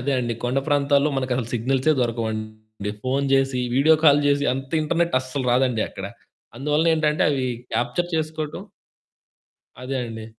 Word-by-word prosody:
అదే 140 Hz, +3 st, -1 dB
అండి 120 Hz, -1 st, -2 dB
కొండ 125 Hz, +2 st, +1 dB
ప్రాంతాల్లో 145 Hz, 0 st, +3 dB
మనకసలు 125 Hz, -3 st, -2 dB
సిగ్నల్సే 130 Hz, +5 st, +1 dB
దొరకవండి. 110 Hz, -2 st, -4 dB
ఫోను 135 Hz, +2 st, 0 dB
జేసి 135 Hz, -1 st, +2 dB, 0.2 s
వీడియో 155 Hz, +4 st, +6 dB
కాలు 145 Hz, -1 st, +6 dB
జేసి 145 Hz, 0 st, +2 dB
అంత 135 Hz, 0 st, -6 dB
ఇంటర్నెట్ 170 Hz, +1 st, 0 dB
అస్సలు 130 Hz, +1 st, -4 dB
రాదండి 125 Hz, -3 st, +2 dB
అక్కడ. -, -, -8 dB, 0.5 s
అందువలనేంటంటే 150 Hz, +2 st, +1 dB
అవి 135 Hz, -3 st, -1 dB, 0.3 s
క్యాప్చర్ 125 Hz, +9 st, -1 dB
చేసుకోటం 155 Hz, -1 st, -3 dB, 1.2 s
అదే 135 Hz, +1 st, -3 dB
అండి. 110 Hz, -1 st, -7 dB
135 Hz, 135 wpm, -23 LUFS, 120-150 Hz, 1.2 s, వీడియో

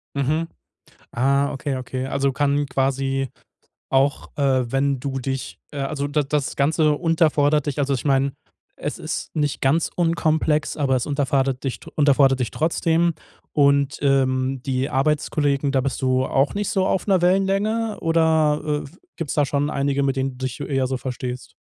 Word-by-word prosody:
Mhm. 150 Hz, +4 st, 0 dB, 0.7 s
Ah, 140 Hz, +3 st, +2 dB
okay, 135 Hz, 0 st, -3 dB
okay. 130 Hz, 0 st, -4 dB
Also 140 Hz, 0 st, 0 dB
kann 145 Hz, +1 st, +1 dB
quasi 135 Hz, 0 st, -1 dB, 0.6 s
auch, 135 Hz, +1 st, +1 dB
äh, 130 Hz, -4 st, +1 dB
wenn 135 Hz, 0 st, +1 dB
du 135 Hz, 0 st, -3 dB
dich 135 Hz, 0 st, -4 dB
äh, 145 Hz, -, -7 dB
also 140 Hz, +1 st, -2 dB
da 145 Hz, +1 st, +1 dB
das 140 Hz, 0 st, -2 dB
Ganze 155 Hz, +2 st, +3 dB
unterfordert 155 Hz, -3 st, +2 dB
dich. 145 Hz, -1 st, -3 dB
Also, 140 Hz, -1 st, +1 dB
ich 125 Hz, -, -4 dB
meine, 135 Hz, 0 st, +2 dB, 0.4 s
es -, -, -4 dB
ist -, -, -5 dB
nicht 145 Hz, -2 st, 0 dB
ganz 145 Hz, +5 st, +2 dB
unkomplex, 160 Hz, -2 st, +1 dB
aber 135 Hz, -3 st, +2 dB
es 125 Hz, -, -2 dB
unterfardert 135 Hz, -2 st, 0 dB
dich 135 Hz, -, -2 dB, 0.2 s
unterfordert 140 Hz, -3 st, +4 dB
dich 120 Hz, -, -1 dB
trotzdem. 165 Hz, +1 st, +1 dB, 0.4 s
Und, 140 Hz, -1 st, +3 dB
ähm, 130 Hz, -1 st, +1 dB
die 130 Hz, 0 st, -1 dB
Arbeitskollegen, 145 Hz, 0 st, +1 dB
da 135 Hz, -, +3 dB
bist 135 Hz, 0 st, -2 dB
du 130 Hz, 0 st, +2 dB
auch 135 Hz, +1 st, +1 dB
nicht 205 Hz, 0 st, -2 dB
so 190 Hz, -4 st, +1 dB
auf 190 Hz, -, 0 dB
'ner 190 Hz, -4 st, +3 dB
Wellenlänge 195 Hz, +4 st, +1 dB
oder, 155 Hz, -2 st, +2 dB
äh, -, -, -14 dB, 0.3 s
gibt's 165 Hz, -5 st, -3 dB
da 145 Hz, -2 st, +2 dB
schon 145 Hz, +2 st, 0 dB
einige, 140 Hz, 0 st, 0 dB
mit 135 Hz, -1 st, 0 dB
denen 135 Hz, 0 st, -1 dB
du 125 Hz, -, -15 dB
dich 125 Hz, -, -6 dB
eher 135 Hz, -2 st, 0 dB
so 130 Hz, -, -2 dB
verstehst? 125 Hz, -1 st, -6 dB
140 Hz, 165 wpm, -22 LUFS, 135-155 Hz, 0.7 s, unterfordert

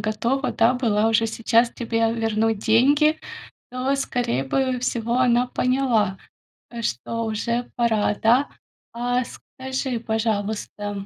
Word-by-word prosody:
готова, 230 Hz, +6 st, -1 dB
да, 230 Hz, +3 st, +3 dB
была 225 Hz, -3 st, +1 dB
уже 225 Hz, 0 st, +2 dB
сейчас 230 Hz, +1 st, +2 dB
тебе 230 Hz, -1 st, -1 dB
вернуть 225 Hz, -1 st, 0 dB
деньги, 285 Hz, +9 st, +3 dB, 0.5 s
то, 255 Hz, +2 st, 0 dB
скорее 245 Hz, -, -1 dB
бы 255 Hz, -, 0 dB
всего, 235 Hz, 0 st, -1 dB
она 245 Hz, -1 st, +3 dB
поняла, 250 Hz, -7 st, +1 dB, 0.5 s
э, 235 Hz, -1 st, -7 dB
что 230 Hz, -, -3 dB
уже 235 Hz, +2 st, -2 dB
пора, 220 Hz, -4 st, +1 dB
да. 245 Hz, +6 st, +3 dB, 0.4 s
А 245 Hz, +1 st, 0 dB
скажи, 260 Hz, -1 st, -5 dB
пожалуйста, 210 Hz, -2 st, -3 dB
230 Hz, 120 wpm, -23 LUFS, 220-250 Hz, 0.5 s, да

